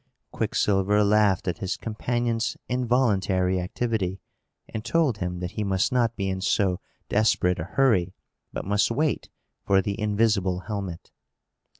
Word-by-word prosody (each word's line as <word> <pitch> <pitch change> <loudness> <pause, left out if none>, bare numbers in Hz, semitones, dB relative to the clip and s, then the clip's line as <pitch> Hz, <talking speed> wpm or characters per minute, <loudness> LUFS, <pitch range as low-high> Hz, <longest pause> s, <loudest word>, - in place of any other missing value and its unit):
Quicksilver 105 -1 +2
laughed 105 -3 +3
at 90 - -2
his 95 -1 -2
companion's 115 +1 -2
involuntary 105 -7 +1
activity, 95 -1 -2 0.5
and 110 - -6
told 130 -4 +1
him 90 -1 -3
that 90 0 -3
he 110 0 -3
must 95 +4 +1
not 120 -2 +1
be 100 -2 -2
in 95 0 -2
so 95 -1 +1 0.3
desperate 95 -4 +2
a 80 - -3
hurry, 95 -5 +2 0.4
but - - -5
must 100 +1 +2
wait 145 +5 -1 0.3
for 95 -1 +3
the 100 +2 -2
invisible 105 -4 +1
helmet. 100 -5 -6
105 Hz, 135 wpm, -25 LUFS, 95-115 Hz, 0.5 s, laughed